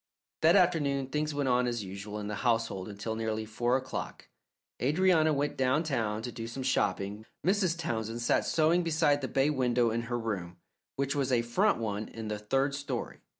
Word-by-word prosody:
That 165 +2 +6
afternoon 145 -8 +2
things 150 +2 -1
went 145 -2 0
on 125 0 +3
as 120 -3 -2
usual 100 +2 -7
in 105 - -5
the 105 0 -3
household 115 -5 0
until 105 +2 -4
nearly 110 -1 -2
four 120 +3 +1
o'clock. 130 0 -6 0.5
Adrianna 160 +3 +3
went 145 0 -1
downtown 130 -6 0
to 120 - -4
do 115 -1 -6
some 130 +3 -5
shopping. 105 -5 0 0.2
Mrs. 185 -3 +2
Townsend 115 -8 -3
sat - - +3
sewing 165 +2 +3
beside 155 -3 +2
the 130 - -2
bay 135 +3 +2
window 125 -4 +2
in 115 +1 -1
her 120 - 0
room, 95 -7 -4 0.4
which 140 0 -1
was 135 -2 0
a 120 -2 +3
front 190 - +2
one 105 -2 -3
in 110 -1 -7
the 105 -1 -3
third 135 +7 0
story. 140 0 -4
125 Hz, 185 wpm, -30 LUFS, 110-145 Hz, 0.5 s, That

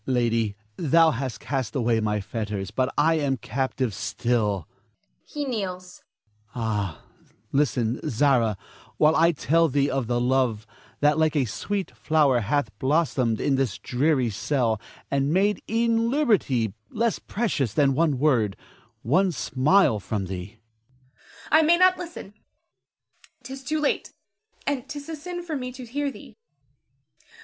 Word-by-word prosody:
Lady, 115 -4 +1 0.2
thou 165 0 +4
hast 130 -2 -4
cast 135 -4 -3
away 120 -3 +2
my 105 -1 0
fetters, 105 -1 -4
but 130 +1 0
I 160 +2 +3
am 135 -3 0
captive 130 0 -2
still 105 -4 -1 0.6
[he 295 -1 -4
kneels]. 185 -7 -5 0.5
Ah, 105 -7 -2 0.5
listen, 125 -4 +1
Zara, 120 -4 +2 0.4
while 155 +1 +4
I 165 +1 +5
tell 165 +1 +2
thee 140 -1 +1
of 135 -3 -1
the 120 0 0
love 125 -3 +1 0.4
that 150 +1 +3
like 155 0 +2
a 140 -3 +2
sweet 195 - -4
flower 150 -6 +3
hath 120 +2 0
blossomed 130 -6 +1
in 140 -2 +1
this 130 -6 -1
dreary 130 -2 +1
cell, 115 0 0 0.3
and 140 +1 +1
made 200 +4 +2
e'en 230 0 +2
liberty 200 - +1 0.2
less 230 0 0
precious 190 - -1
than 140 +1 +3
one 150 -1 +2
word, 120 -8 +2 0.5
one 180 - +3
smile 145 - +2
from 100 -1 -3
thee. 95 +4 -7 0.4
Zara. 130 +1 -36 0.3
I 315 - +7
may 330 +2 +4
not 370 +1 +4
listen, 340 - -8 1.1
'tis 270 +1 -8
too 305 +4 -1
late, 300 - -1 0.5
and 280 -1 -2
'tis 290 0 -7
a 320 - -3
sin 350 +3 -6
for 325 -3 -4
me 250 -2 -4
to 255 -1 -9
hear 285 +4 -2
thee. - - -13
140 Hz, 140 wpm, -25 LUFS, 115-195 Hz, 1.1 s, I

